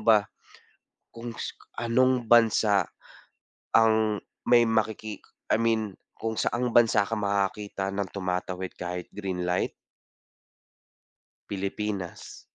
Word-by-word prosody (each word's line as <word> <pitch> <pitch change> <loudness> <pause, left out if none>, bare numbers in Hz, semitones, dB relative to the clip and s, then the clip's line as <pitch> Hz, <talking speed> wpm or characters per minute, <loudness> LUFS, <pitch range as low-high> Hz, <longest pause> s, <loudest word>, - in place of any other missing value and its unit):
ba? 110 -3 +6 0.9
Kung 115 +1 -6 0.5
anong 125 +1 +2
bansa, 110 -4 +4 0.8
ang 110 -1 +4 0.3
may 120 -1 +7
makiki 110 -1 -1 0.3
I - - +4
mean 110 -3 +1 0.2
kung 110 0 -2
saan 120 +1 0
bansa 115 -4 +5
ka 115 - -2
makakakita 100 -1 -1
ng 100 -1 -2
tumatawid 90 -1 -3
kahit 90 0 -5
green 95 -3 -3
light? 90 0 0 1.8
Pilipinas. 100 -1 -4
105 Hz, 95 wpm, -27 LUFS, 95-115 Hz, 1.8 s, may